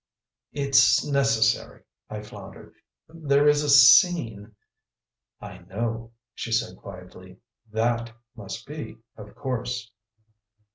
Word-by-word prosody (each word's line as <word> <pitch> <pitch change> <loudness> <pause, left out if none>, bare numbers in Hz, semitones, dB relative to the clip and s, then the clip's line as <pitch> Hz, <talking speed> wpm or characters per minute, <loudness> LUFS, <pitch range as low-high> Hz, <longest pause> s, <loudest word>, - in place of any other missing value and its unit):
"It's 135 -3 +3
necessary," 125 -6 0 0.3
I 105 0 -7
floundered. 100 -2 -13 0.3
"There 150 -3 0
is 150 0 +3
a 150 - -3
scene 130 - +4 0.4
" - - -67 0.3
"I - - -11
know," 115 +5 -5 0.2
she 115 - -7
said 115 0 -1
quietly. 90 -1 -13 0.3
"THAT 115 +1 -1 0.2
must 110 0 -9
be, 150 -6 -9 0.2
of 105 -1 -13
course." 125 -3 -5
115 Hz, 105 wpm, -24 LUFS, 105-140 Hz, 0.4 s, scene